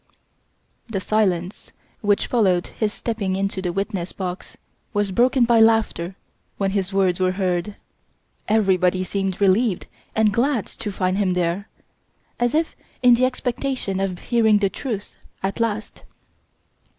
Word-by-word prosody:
The 205 -4 -2
silence 190 -3 -1 0.3
which 205 -1 +2
followed 190 -7 +2
his 215 -2 -2
stepping 210 -5 -2
into 195 0 -2
the 180 -2 -1
witness 190 -1 -3
box 180 -1 -6 0.4
was 205 -2 0
broken 245 +4 +3
by 235 -1 +4
laughter 225 -5 +3 0.4
when 195 -1 0
his 195 -1 -1
words 190 -2 +2
were 185 0 +2
heard. 185 +1 -1 0.7
Everybody 190 -4 +2
seemed 195 0 -2
relieved 200 +1 +2 0.3
and 220 -2 +3
glad 240 -1 +1
to 210 - -6
find 185 0 0
him 185 -3 +1
there, 180 +3 -1 0.7
as 240 +3 +1
if 320 +1 0 0.3
in 245 -1 +8
the 245 +2 +4
expectation 255 -5 -2
of 195 -2 -1
hearing 220 0 +3
the 200 -2 +1
truth 210 -2 -5 0.3
at 195 +3 -2
last. 220 -2 -2
200 Hz, 140 wpm, -22 LUFS, 185-225 Hz, 0.7 s, in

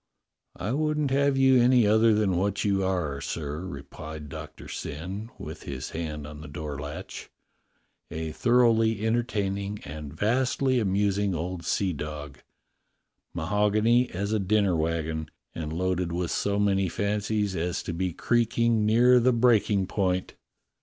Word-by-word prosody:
"I 105 - -3
wouldn't 150 0 0
have 140 0 +2
you 130 -2 +5
any 125 -1 +5
other 110 +2 +5
than 105 -4 +1
what 100 +3 0
you 100 -1 +2
are, 85 -7 -1
sir," 75 -1 -4
replied 75 -2 -8
Doctor - - -9
Syn, 95 +9 -6
with - - -8
his 65 -2 -6
hand 75 -2 -4
on 75 0 -9
the 80 - -9
door 75 0 -6
latch 75 0 -7 0.4
— - - -45
"a 80 0 -4
thoroughly 115 -1 +3
entertaining 105 -4 -1
and 75 0 -7
vastly 130 - +1
amusing 100 -1 +1
old 85 +2 -4
seadog, 75 -8 -3 1.0
mahogany 105 +7 +2
as 100 +4 -3
a 110 - +2
dinner 100 -1 +2
wagon, 80 -1 -2 0.2
and 80 -2 -5
loaded 90 +1 -1
with 85 0 -2
so 100 0 0
many 100 -2 +2
fancies 105 +1 -1
as 85 +1 -2
to 85 - -4
be 90 +2 -1
creaking 115 +2 +1
near 125 +3 +6
the 125 +2 +4
break 120 -2 +3
ing 100 -3 +2
point." 95 -1 -1
100 Hz, 145 wpm, -27 LUFS, 80-110 Hz, 1.0 s, near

